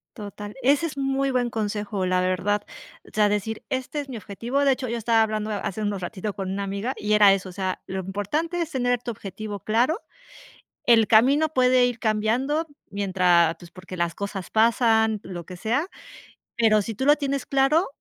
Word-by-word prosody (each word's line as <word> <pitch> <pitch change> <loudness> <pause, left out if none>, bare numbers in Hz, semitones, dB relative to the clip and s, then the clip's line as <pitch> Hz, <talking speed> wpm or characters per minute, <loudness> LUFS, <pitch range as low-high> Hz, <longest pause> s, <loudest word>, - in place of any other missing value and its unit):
Total, 205 -1 -8
ese 280 +6 +3
es 305 - -4
muy 270 0 0
buen 245 -1 +1
consejo, 210 -3 -2
la 185 0 +1
verdad. 185 +3 0 0.4
O - - -17
sea, 210 -1 +3
decir, 210 +2 -2
este 260 +2 -3
es 280 -1 -6
mi 240 - -5
objetivo. 235 +7 -2
De 275 - +4
hecho, 255 -1 -5
yo 235 +1 -2
estaba 225 0 +3
hablando 215 0 -2
ha 210 - -2
hace 200 +2 -4
unos 205 -2 -2
ratitos 200 +2 -4
con 190 -1 -4
una 200 +1 -2
amiga 200 +6 -3
y 210 +1 -1
era 205 -2 +7
eso, 190 -1 -3
o - - -9
sea, 185 0 -3
lo 190 0 -4
importante 250 - -2
es 330 - -2
tener 245 -2 0
tu 245 - -6
objetivo 205 -1 -6
claro. 245 - +1 0.9
El 225 -3 +5
camino 270 +9 +4
puede 255 -3 +4
ir 245 -1 -3
cambiando 240 +9 0 0.2
mientras, 180 -4 +3
pues, 170 0 -14
porque 185 +1 -10
las 170 -1 -1
cosas 200 -2 -5
pasan, 220 -1 +3
lo 175 -3 -7
que 180 - -9
sea, 240 - 0 0.7
pero, 220 -2 +4
si 225 +2 -5
tú 265 - -3
lo 295 +1 +6
tienes 280 -1 -2
claro, 275 +6 +3
220 Hz, 195 wpm, -24 LUFS, 200-255 Hz, 0.9 s, era